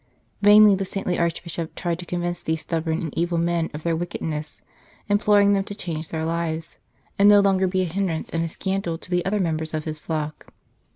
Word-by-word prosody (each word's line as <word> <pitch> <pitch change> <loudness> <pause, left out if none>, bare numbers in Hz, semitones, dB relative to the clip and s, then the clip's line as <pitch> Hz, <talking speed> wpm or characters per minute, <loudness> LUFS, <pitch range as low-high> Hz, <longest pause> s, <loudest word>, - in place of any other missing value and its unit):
Vainly 210 0 +8
the 195 0 0
saintly 190 -1 -2
Archbishop 170 -1 -3
tried 170 -1 -2
to 175 - -8
convince 175 0 -2
these 160 -1 -2
stubborn 160 +2 -2
and 160 - -5
evil 170 +1 0
men 170 0 0
of 150 0 -8
their 170 -1 +1
wickedness, 155 -3 -4 0.4
imploring 205 0 +4
them 195 -1 +2
to 205 - -7
change 165 -6 -5
their 160 -1 -3
lives, 165 0 -3 0.4
and 200 +1 +7
no 205 0 +8
longer 190 -1 +3
be 185 0 0
a - - 0
hindrance 175 -2 -2
and 165 0 0
a 165 - -2
scandal 190 -1 -2
to 180 - -14
the 180 0 +1
other 205 +2 +1
members 160 -3 -1
of 155 - -2
his 155 -1 -5
flock. 155 -1 -5
170 Hz, 205 wpm, -23 LUFS, 160-190 Hz, 0.4 s, Vainly